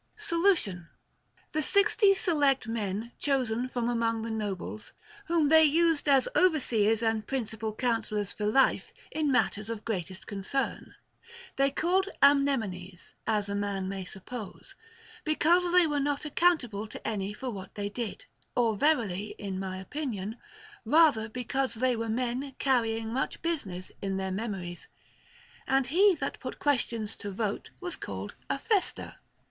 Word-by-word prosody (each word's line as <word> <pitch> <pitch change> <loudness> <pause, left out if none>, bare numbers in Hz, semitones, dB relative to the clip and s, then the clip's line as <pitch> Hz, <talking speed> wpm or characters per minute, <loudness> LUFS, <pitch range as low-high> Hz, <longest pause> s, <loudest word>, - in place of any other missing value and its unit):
Solution. 335 - +1 0.6
The 310 - 0
sixty 400 - +4
select 290 - +2
men 220 0 -3
chosen 255 -4 0
from 245 -2 -2
among 230 -2 0
the 230 - -4
nobles, 210 -1 -4 0.3
whom 330 -5 +2
they 320 0 +7
used 320 0 +3
as 270 -2 +5
overseers 235 - +3
and 225 -1 0
principal 225 -4 -3
coun 230 0 0
sellors 210 -2 -3
for 210 - -2
life 265 +6 +3 0.2
in 305 -2 0
matters 220 -3 +1
of 225 -2 -5
greatest 190 -3 -4
concern, 205 +7 -3 0.6
they 275 0 +3
called 365 +7 +1
Amnemones 225 -11 +2
(as 210 -2 +1
a 200 - -3
man 200 -2 -2
may 195 0 -4
suppose) 195 +4 -8 0.5
because 345 +3 +3
they 360 -1 +6
were 295 -2 0
not 285 +1 -1
accountable 275 - +1
to - - -8
any 200 -2 -2
for 250 +4 -5
what 195 -3 -9
they 205 -1 -2
did, 220 +1 -5 0.3
or 230 -3 +2
verily 215 - +1
(in 195 -2 -4
my 190 -1 -4
opinion) 220 -1 -4 0.5
rather 255 -4 +4
because 250 +2 -2
they 250 +2 +2
were 225 0 -3
men 250 +4 -2
carrying 225 -4 +1
much 260 - -2
business 200 - -3
in 195 -1 -2
their 190 0 -2
memories. 185 -4 -4 0.8
And 270 0 +3
he 370 +8 +4
that - - -4
put - - -6
questions 235 -6 0
to 205 - -6
vote 200 +1 -3
was 360 -1 -4
called - - -6 0.2
Aphester. 415 -5 -1
230 Hz, 145 wpm, -29 LUFS, 205-290 Hz, 0.8 s, they